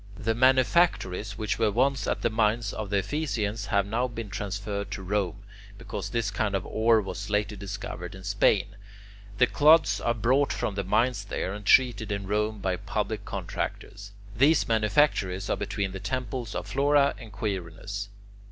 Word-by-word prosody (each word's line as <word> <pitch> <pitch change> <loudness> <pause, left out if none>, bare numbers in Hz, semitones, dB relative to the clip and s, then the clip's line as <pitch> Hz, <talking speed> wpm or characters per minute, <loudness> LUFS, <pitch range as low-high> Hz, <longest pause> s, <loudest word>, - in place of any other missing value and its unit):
The 115 +3 0
manufactories 125 - +2
which 110 -1 -2
were 110 -2 +3
once 130 +5 +1
at - - -1
the 115 - +2
mines 110 -1 +1
of 110 -2 -5
the 100 - +1
Ephesians 110 -5 -2
have 100 -1 +2
now 115 +5 0
been 115 -4 -7
transferred 100 0 -4
to 95 -1 -6
Rome, 95 -2 -2 0.3
because - - -6
this 115 -4 -1
kind 105 0 -1
of 95 - -2
ore 110 +1 +3
was 100 +1 -6
later 105 0 0
discovered 100 -2 -6
in 95 - -11
Spain. 100 +1 +2 0.6
The 125 - +6
clods 155 +2 +4
are 120 - +1
brought 130 +6 +2
from 105 - -2
the 100 0 -2
mines 115 +2 +1
there, 95 -1 -3
and 105 -1 -8
treated 115 -5 +4
in 100 -1 -3
Rome 105 +2 0
by 95 -2 -1
public - - -3
contractors. 100 0 -5 0.2
These 140 +7 +4
manufactories 105 -4 +1
are - - +2
between 100 -1 -3
the 95 - -6
temples 125 +1 -4
of - - -3
Flora 140 +1 +3
and 115 -3 -11
Quirinus. 100 0 -4
5. 100 0 -22
105 Hz, 170 wpm, -27 LUFS, 100-120 Hz, 0.6 s, The